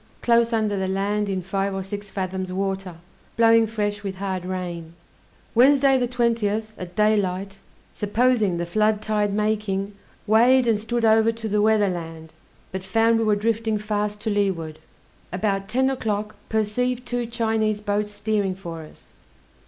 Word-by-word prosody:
close 235 0 +3
under 215 -3 +1
the 190 -1 -1
land 200 +2 -1
in 190 -2 -2
five 195 +1 -2
or 190 - -3
six 205 +1 -6
fathoms 185 -1 -4
water, 195 -1 -3 0.4
blowing 230 -1 +5
fresh, 205 -2 -2
with 195 -2 -5
hard 190 -2 -3
rain. 175 -3 -5 0.6
Wednesday, 270 +2 +5
the 250 -2 +1
20th, 225 -3 0
at 180 -2 -9
daylight, 195 -2 +1 0.3
supposing 215 -3 +1
the 170 - -2
flood 215 +4 +1
tide 210 -1 0
making, 205 -1 -1 0.3
weighed 240 +4 +5
and 225 -3 +2
stood 230 +2 -1
over 220 +1 +4
to 225 -1 -5
the 210 0 +1
weather 215 -1 +3
land, 165 -2 -7 0.4
but 190 0 -5
found 225 +4 +2
we - - +1
were 210 -1 +3
drifting 220 +1 0
fast 210 0 -2
to 220 - -1
leeward. 175 -6 -1 0.5
About 195 +1 -1
ten 260 +5 +1
o'clock 215 -5 -2
perceived 240 +3 -1
two 245 -1 -2
Chinese 220 -2 0
boats 210 0 -1
steering 205 -2 -1
for 170 -4 -7
us. 155 - -16
210 Hz, 155 wpm, -23 LUFS, 195-225 Hz, 0.6 s, blowing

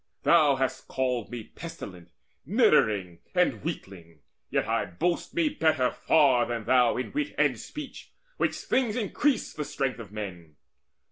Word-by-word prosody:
Thou 150 -5 +5
hast 130 0 -2
called 125 -4 -1
me 120 -2 -6
pestilent, 100 - -9 0.3
niddering, 95 -5 +3 0.2
And - - +2
weakling: 85 -5 -7 0.3
yet - - 0
I - - +1
boast 170 - -2
me 335 -3 +3
better 160 - +2
far 130 -7 +3
Than 120 -2 -3
thou 125 -2 +4
in 125 - -3
wit 295 +1 -2
and - - +2
speech, - - -9 0.3
which - - +1
things 240 -5 0
increase 250 +5 0
The 150 - -3
strength 135 -3 -2
of 105 -4 -9
men. 90 -7 -7
125 Hz, 145 wpm, -27 LUFS, 100-160 Hz, 0.3 s, Thou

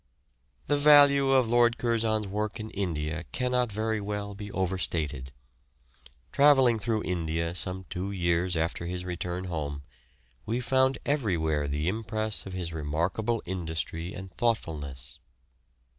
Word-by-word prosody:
The 145 0 +1
value 145 -2 +7
of 130 -3 +4
Lord 120 0 +4
Curzon's 110 -2 +1
work 105 +3 -3
in 110 0 -6
India 85 -4 -2
cannot 125 - 0
very 110 +1 -1
well 100 0 -4
be 100 0 -8
overstated. 80 -8 -2 1.0
Travelling 135 -5 +5
through 110 0 -1
India 85 -1 -1
some 90 +1 -3
two 95 +3 -4
years 85 -1 +1
after 85 +1 -1
his 90 0 -4
return 90 0 -3
home, 75 -5 -4 0.6
we 115 +3 -1
found 130 +1 +2
everywhere 80 - 0
the 75 +3 -1
impress 110 +1 -2
of 95 - -7
his 90 -3 -3
remarkable 85 +10 -1
industry 85 -1 -3
and 95 -2 -8
thoughtfulness. 75 - -2
95 Hz, 130 wpm, -28 LUFS, 85-115 Hz, 1.0 s, value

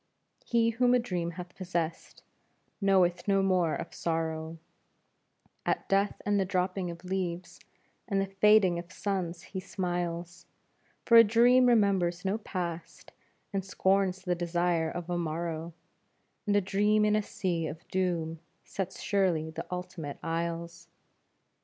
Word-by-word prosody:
He 230 -1 +2
whom 245 +2 +3
a - - +4
dream 180 -8 -2
hath 180 0 -8
possessed 170 -3 -4 0.6
knoweth 185 -3 +3
no 195 -1 +3
more 180 -4 +2
of - - -6
sorrow, 160 -1 -2 1.1
At - - -1
death 195 +1 +1
and 205 0 +2
the - - +3
dropping 185 -1 -1
of 170 +1 -9
leaves 180 -1 -3 0.5
and 195 -3 0
the 195 - +1
fading 195 -2 +4
of 175 +1 -10
suns 180 -4 -3
he 190 - -6
smiles, 175 -3 -4 0.6
For 235 - +7
a 230 - +11
dream 240 +3 +5
remembers 195 -6 +2
no 200 +3 0
past 170 -5 -6 0.4
and 195 -1 -1
scorns 190 0 +1
the 180 -1 0
desire 175 -1 0
of 175 +1 -6
a 175 -1 -1
morrow, 165 0 -3 0.8
And 205 - +2
a 205 - +4
dream 210 +3 +2
in 210 0 +3
a 215 - +2
sea 175 -5 -2
of 160 +2 -9
doom 170 -3 -1 0.2
sets 190 -1 -5
surely 180 -6 +1
the - - -6
ultimate 180 -5 -5
isles. 170 0 -3
180 Hz, 140 wpm, -29 LUFS, 170-195 Hz, 1.1 s, a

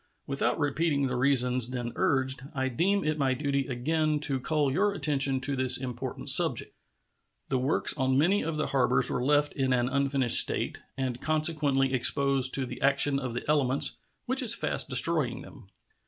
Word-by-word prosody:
Without 140 0 -2
repeating 145 -1 -1
the 130 -1 -3
reasons 125 -2 +3
then 120 -2 -5
urged, 130 -1 -1
I 130 -1 -2
deem 195 +10 -1
it 155 0 -3
my 135 -2 0
duty 140 -1 -3
again 150 +4 -2
to 140 -3 0
call 145 0 -1
your 200 +5 0
attention 140 -7 -1
to 140 +1 -1
this 130 0 +3
important 125 -2 -6
subject. - - +1 0.8
The 130 - -1
works 130 +4 -1
on 130 -2 -1
many 180 +8 +1
of 160 -1 -5
the 155 - -2
harbors 125 -2 0
were 125 - -3
left 145 +2 +1
in 135 -1 -2
an 125 -1 0
unfinished 135 -2 +4
state, - - +1 0.2
and 130 -2 -4
consequently 150 -4 +1
exposed 135 +1 +2
to 135 - -1
the - - -10
action 140 0 +2
of 125 -3 -6
the 125 - -6
elements, 140 -3 +1 0.3
which 260 +2 -1
is 235 -3 +8
fast - - +1
destroying 130 -1 +1
them. 135 -7 -16
135 Hz, 175 wpm, -26 LUFS, 130-150 Hz, 0.8 s, is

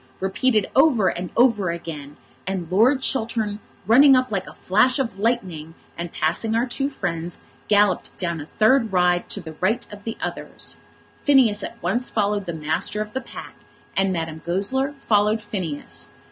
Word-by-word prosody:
repeated 210 +3 +1
over 265 -9 +4
and 180 0 -4
over 230 -7 +4
again, 155 -4 -6 0.3
and 185 -3 -3
Lord 245 +8 +4
Chiltern, 225 -5 -1 0.3
running 265 +6 +7
up 255 -1 +1
like 195 -2 -2
a - - -10
flash 215 +8 +2
of 230 -8 -3
lightning, 185 -9 -2 0.2
and 170 0 -5
passing 220 +8 0
our 235 +2 +2
two 270 +2 -2
friends, 175 - -4 0.3
galloped 205 -3 +2
down 170 -4 -2
a 145 - -9
third 225 +1 +4
ride 180 -1 +2
to - - -1
the 160 -2 -9
right 210 +6 +1
of 205 0 -11
the 225 +1 -5
others. - - -4 0.4
Phineas 255 -8 +4
at 235 - -6
once 245 +1 0
followed 205 -2 0
the 170 - -3
master 160 +6 0
of 215 0 -4
the 260 - -2
pack, - - -10 0.4
and 195 0 +2
Madame 160 -2 -4
Goesler 230 +11 -1
followed 210 +1 +3
Phineas. 155 - -4
205 Hz, 165 wpm, -23 LUFS, 175-235 Hz, 0.4 s, running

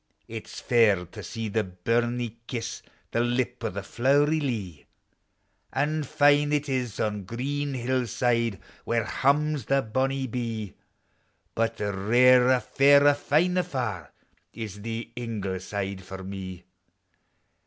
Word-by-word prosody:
It 110 -1 -7
's - - -8
fair 110 -7 +3
to 105 +5 -10
see 110 +4 -5
the 110 +1 0
buruie 115 +5 -1
kiss 120 -2 -4 0.3
The - - 0
lip 120 0 0
o' 115 - 0
the 100 +1 -5
flow'ry 145 +8 +2
lea; 105 - -4 0.9
An' 150 +3 0
fine 145 +1 +3
it 150 0 +1
is 125 -5 -2
on 105 -2 -1
green 140 +7 -3
hillside, 120 -3 0 0.2
Where 115 -1 0
hums 145 +1 +1
the 135 0 +2
bonuie 135 +4 0
bee, 115 -4 -4 0.8
But 115 0 -1
rarer, 125 +6 +4
fairer, 140 +2 +5
finer 175 +6 +2
far 120 - -4 0.4
Is 105 -3 -7
the 115 +1 -5
Ingle 105 -6 -3
side 95 0 -4
for 95 +1 -8
me. 95 -2 -7
120 Hz, 125 wpm, -27 LUFS, 105-135 Hz, 0.9 s, fairer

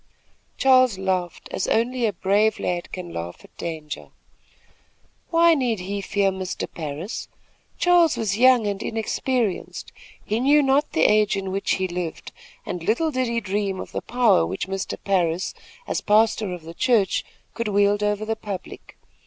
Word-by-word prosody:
Charles 255 -5 +5
laughed, 185 -3 -2
as - - -2
only 240 +1 +1
a 210 - -1
brave 200 +4 +2
lad 175 -1 -3
can 180 -2 -7
laugh 85 +1 -6
at - - -19
danger. 155 -3 -6 1.2
Why 335 0 +5
need 245 - 0
he 200 +2 -3
fear 195 0 +1
Mr. 185 -1 -4
Parris? 155 - -6 0.5
Charles 350 -3 +4
was 210 -3 0
young 250 0 +5
and 200 0 -2
inexperienced. 225 -1 -2 0.3
He 215 +2 -1
knew 290 +4 +4
not 275 +2 +2
the 160 - +2
age 210 -1 +4
in 195 -1 -3
which 195 +1 0
he 190 0 -1
lived, 175 -2 -5 0.3
and 180 - -4
little 240 - +1
did 255 -2 0
he 235 0 0
dream 200 -2 -2
of - - -7
the - - -3
power 240 - +3
which 85 - -3
Mr. 195 0 -3
Parris, 180 -2 0 0.3
as - - -1
pastor 215 -1 +2
of 175 -2 -6
the 165 +1 -9
church, 230 -3 +2 0.3
could 230 -1 -3
wield 205 0 +2
over 210 0 0
the 225 +1 -1
public. 200 -4 -8
205 Hz, 160 wpm, -23 LUFS, 185-235 Hz, 1.2 s, Charles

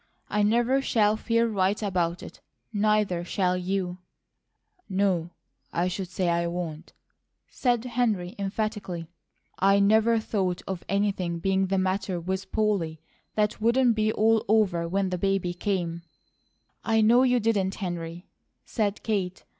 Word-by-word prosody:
I 210 - +2
never 240 +5 +3
shall 215 -5 +2
feel 230 +1 +1
right 200 -2 +1
about 180 -4 -1
it; - - -11 0.3
neither 210 -4 +1
shall 180 0 0
you 180 0 -2 0.4
" 365 - -44 0.2
"No, 175 -4 0 0.4
I 175 +2 0
should 185 +1 -4
say 185 0 -2
I 170 0 +1
won't!" 170 -3 -5 0.6
said 245 -2 0
Henry 225 -7 0
emphatically. 200 -4 -3 0.5
"I 195 +1 +4
never 220 +3 +4
thought 190 -5 -2
of 190 -2 -4
anything 195 -4 0
being 190 +2 +1
the 195 +1 0
matter 185 -1 -1
with 190 +2 -4
Polly 195 -8 0 0.4
that 210 0 0
wouldn't 240 +2 +4
be 215 0 +1
all 220 0 +3
over 190 -6 +2
when 190 +1 0
the 180 - -2
baby 195 -2 0
came 175 -3 -2 0.4
" - - -45
"I 225 -1 +2
know 235 +3 +5
you 250 -1 +3
didn't, 205 -4 0
Henry," 175 -1 -5 0.4
said 210 -3 -2
Kate. 190 -4 -2
195 Hz, 145 wpm, -26 LUFS, 180-215 Hz, 0.6 s, know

